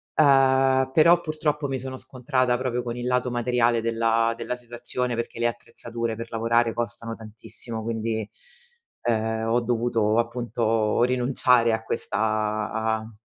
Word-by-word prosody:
Uhm, 135 -2 +4
però 170 +2 +6
purtroppo 155 -2 -2
mi 135 -1 -2
sono 130 +1 -6
scontrata 130 -1 -1
proprio 125 -1 -2
con 120 0 -4
il 120 - -4
lato 125 0 +1
materiale 120 -1 +2
della 115 0 +1
della 125 - -4
situazione, 120 0 -4
perché 115 0 -5
le 120 - +2
attrezzature 115 -1 -4
per 115 0 -6
lavorare 115 0 +1
costano 115 -1 -4
tantissimo, 110 +1 -6
quindi, 110 -1 -3 0.7
ehm, 110 -1 0
ho 120 +2 +2
dovuto 115 -2 +1
appunto 115 -2 0
rinunciare 125 -1 +3
a 110 0 0
questa - - -3
a 110 +1 -1
120 Hz, 135 wpm, -25 LUFS, 115-125 Hz, 0.7 s, però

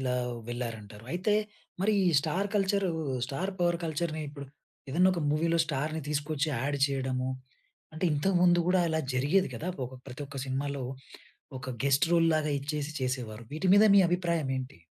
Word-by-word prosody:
ఇలా 125 -1 0 0.3
వెళ్లారంటారు. 115 -3 -6
అయితే, 185 +4 +1 0.5
మరి 215 +3 +3
ఈ - - +3
స్టార్ 180 +7 -1
కల్చర్ 200 -1 +2 0.4
స్టార్ 175 +8 -3
పవర్ 175 -1 +2
కల్చర్‌ని 155 0 -2
ఇప్పుడు 140 -1 -9 0.4
ఏదన్నా 180 +6 +4
ఒక 170 - -2
మూవీలో 165 +2 +2
స్టార్‌ని 155 +2 -2
తీసుకొచ్చి 150 0 -1
యాడ్ 145 +4 -1
చేయడము. 130 -1 -1 0.6
అంటే 160 - -3
ఇంతకుముందు 175 +3 +3
కూడా 185 0 +4
అలా 160 0 0
జరిగేది 145 +10 +2
గదా! 170 - -4 0.2
ఒక 130 - -11
ప్రతి 130 +2 -7
ఒక్క 140 0 -8
సినిమాలో 140 +1 -2 0.8
ఒక 130 - -7
గెస్ట్ 140 +2 +3
రోల్ 165 -1 +5
లాగా 155 -1 0
ఇచ్చేసి 145 +1 -3
చేసేవారు 120 -4 -3
వీటి 160 +5 -1
మీద 205 +1 +7
మీ - - +8
అభిప్రాయమేంటి? 155 - -1
150 Hz, 155 wpm, -29 LUFS, 135-175 Hz, 0.8 s, మీ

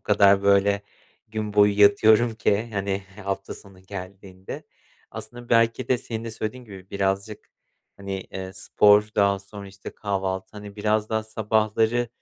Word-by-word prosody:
kadar, 100 -1 +4
böyle, 100 0 +3 0.5
gün 110 -1 -4
boyu 105 0 +4
yatıyorum 110 +3 +5
ki, 110 0 0
hani, 100 0 -2 0.2
hafta 100 0 -4
sonu 95 -2 -14
geldiğinde. 95 0 -9 0.5
Aslında 120 0 -9
belki 115 +1 +2
de 125 - +2
senin 115 0 -6
de 115 - -5
söylediğin 110 +3 -5
gibi 95 -4 -12
birazcık, 100 +1 -2 0.5
hani, 100 -1 -5
eee, 95 0 -8
spor 105 +2 +4
daha 100 -1 +3
sonra, 100 +1 -11
işte, 95 0 -10
kahvaltı, 95 -2 -3
hani, 105 -1 -10
biraz 105 +1 0
daha 110 0 -1
sabahları, 110 +2 0
100 Hz, 140 wpm, -24 LUFS, 100-110 Hz, 0.5 s, yatıyorum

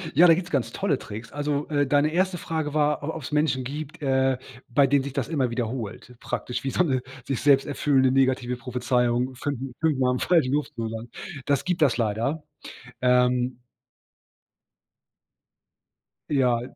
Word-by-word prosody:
Ja, 175 +3 +8
da 165 - +8
gibt's 175 +1 -3
ganz 120 -5 0
tolle 195 -9 0
Tricks, 110 +2 -9
also, 145 0 -2
äh, 145 -1 +2
deine 145 +2 +3
1. 185 +1 +1
Frage 155 -3 -3
war, 150 -1 +1
o - - -3
ob's 150 -2 -6
Menschen 150 -4 +1
gibt, 150 +3 -6
äh, 130 -1 +2 0.3
bei 135 +3 +4
denen 140 0 +3
sich 140 -1 -6
das - - -2
immer 135 -7 0
wiederholt 120 0 -4
praktisch, 125 0 -4
wie 135 - -1
so 180 - +2
'ne 130 -6 0 0.2
sich 135 -2 -2
selbst 140 -2 +5
erfüllende, 135 -2 +2
negative 130 -2 +2
Prophezeiung 125 0 0
5, 140 -1 -3 0.2
5 155 -4 +2
Mal 125 -1 +3
im 125 - -2
falschen 160 -8 +3
Beruf 150 +1 +1
zu 115 - -4
landen. 115 +1 -7 0.3
Das 140 -2 +1
gibt 180 -2 -1
das 135 -5 +4
leider. 115 +8 -1 0.6
Ähm 125 0 +2 2.7
Ja, 125 -4 +3
135 Hz, 165 wpm, -25 LUFS, 125-150 Hz, 2.7 s, Ja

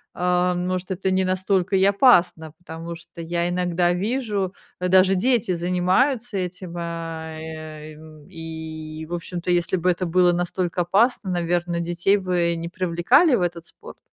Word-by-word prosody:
э, 180 0 +1
может, 180 +1 -3
это 190 +1 -1
не 190 0 +2
настолько 185 0 0
и 190 - +3
опасно, 190 - +4
потому 170 -1 -8
что 170 0 -14
я 170 +1 -1
иногда 175 -1 +1
вижу, 205 -1 -1 0.3
даже 185 +1 +4
дети 210 -2 +1
занимаются 185 +8 +1
этим, 180 -1 -5
э. - - -3
А, 165 -1 -5
и, 155 -1 -8
м, 155 -1 -15
и, 160 -2 -7
в 170 - -7
общем-то, 175 +1 -3
если 175 +1 +1
б 180 0 +1
это 180 +1 0
было 180 +1 +3
настолько 175 0 -1
опасно, 200 +4 +2
наверно, 175 0 -1
детей 175 +3 +1
бы 180 -3 0
не 165 0 -5
привлекали 185 - +3
в 215 - 0
этот 170 -1 -2
спорт? - - -14
175 Hz, 155 wpm, -23 LUFS, 170-185 Hz, 0.3 s, опасно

